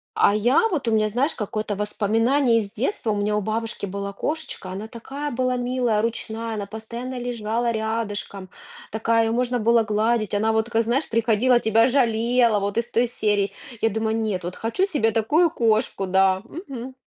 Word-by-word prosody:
А 205 - +4
я 250 - +3
вот 295 - -2
у - - 0
меня, 215 -1 +3
знаешь, 255 +8 0
какое-то 215 -1 -3
воспоминание 225 +5 +2
из 200 -2 -5
детства: 235 - -1
у - - 0
меня 210 +1 0
у - - 0
бабушки 220 0 -3
была 200 +1 -4
кошечка, 295 -5 -5
она 205 +4 -6
такая 275 +6 -6
была 255 +1 0
милая, 245 -3 0
ручная, 225 0 -3
она 205 -1 -3
постоянно 235 +4 -6
лежала 235 -1 -1
рядышком, 220 -4 -3 0.4
такая, 225 +1 +2
её 225 - 0
можно 245 0 0
было 230 +1 +4
гладить, 215 0 0
она 220 +2 +2
вот 220 0 +1
такая 230 -1 +1
знаешь, 250 +7 0
приходила, 230 +2 +3
тебя 225 +2 +4
жалела, 235 -3 +2
вот 200 +2 -3
из 235 0 -1
той 235 +1 +2
серии. 205 -4 0 0.3
Я 225 - +3
думаю: 220 +1 -1
"Нет, 205 -5 -2
вот 180 +1 -5
хочу 230 +13 0
себе 285 - +1
такую 300 +10 +2
кошку", 220 -6 +1
да, 190 0 +3
мгм. 265 - -8
225 Hz, 180 wpm, -23 LUFS, 210-245 Hz, 0.4 s, А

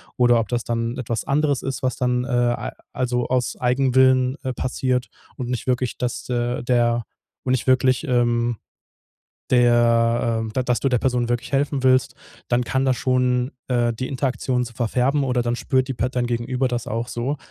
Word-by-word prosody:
oder 120 -1 +4
ob 115 - -2
das 120 0 -2
dann 115 +1 -2
etwas 115 -3 -3
anderes 145 -1 +1
ist, 135 0 -4
was 130 -2 0
dann, 125 -1 0
äh, - - -6
al 120 - 0 0.2
also, 125 -1 -1
aus 125 -1 -1
Eigenwillen, 130 +1 +3
äh, 130 -2 -2
passiert 130 0 -1 0.3
und 125 -2 -5
nicht 125 0 -3
wirklich, 125 -1 0
dass 125 -1 -3
de 120 0 -2
der 120 -1 +2 0.4
und 130 - -1
nicht 130 -1 0
wirklich, 130 +2 +3
ähm, 120 -1 +1 1.0
der 120 -1 +3
ähm, 110 - -7
da 130 - +1
dass 125 -1 0
du 135 - 0
der 125 -2 +2
Person 125 -2 0
wirklich 120 0 -2
helfen 140 0 0
willst, 130 -1 +3 0.3
dann 120 0 +1
kann 130 +2 0
das 130 -2 +2
schon, 125 0 +1 0.2
äh, 120 -2 +1
die 130 +3 -4
Interaktion 130 -2 -1
so 120 - -9
verfärben 125 +5 0
oder 125 -2 +1
dann 120 0 -1
spürt 130 +1 0
die 135 - -2
Part 125 +2 -2
dein 125 -1 0
Gegenüber 125 +2 -1
das 120 -2 -3
auch 115 +2 -3
so. 125 +5 -2
125 Hz, 190 wpm, -22 LUFS, 120-130 Hz, 1.0 s, oder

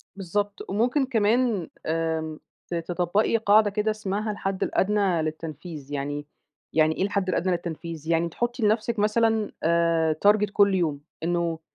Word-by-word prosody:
بالضبط، 200 +1 -3
وممكن 245 +8 +1
كمان 225 -4 +1 0.2
آمم 160 -1 -2 0.3
ت - - -1
تطبّقي 175 +6 +1
قاعدة 215 -1 +4
كده 210 +2 0
اسمها 215 0 -2
الحد 195 -1 -2
الأدنى 195 -4 +1
للتنفيذ، 155 -1 -6
يعني 145 +1 -3 0.5
يعني 155 0 +3
إيه - - +1
الحد 200 -1 0
الأدنى 185 0 +1
للتنفيذ؟ 165 -2 -4
يعني 165 0 +1
تحطّي 240 +6 -2
لنفْسِك 215 +1 +1
مثلًا 220 0 +2
آآ 165 -1 +2
target 210 0 +4
كلّ 200 -1 +4
يوم، 155 -6 0 0.2
إنه 170 -1 0
185 Hz, 140 wpm, -25 LUFS, 165-210 Hz, 0.5 s, قاعدة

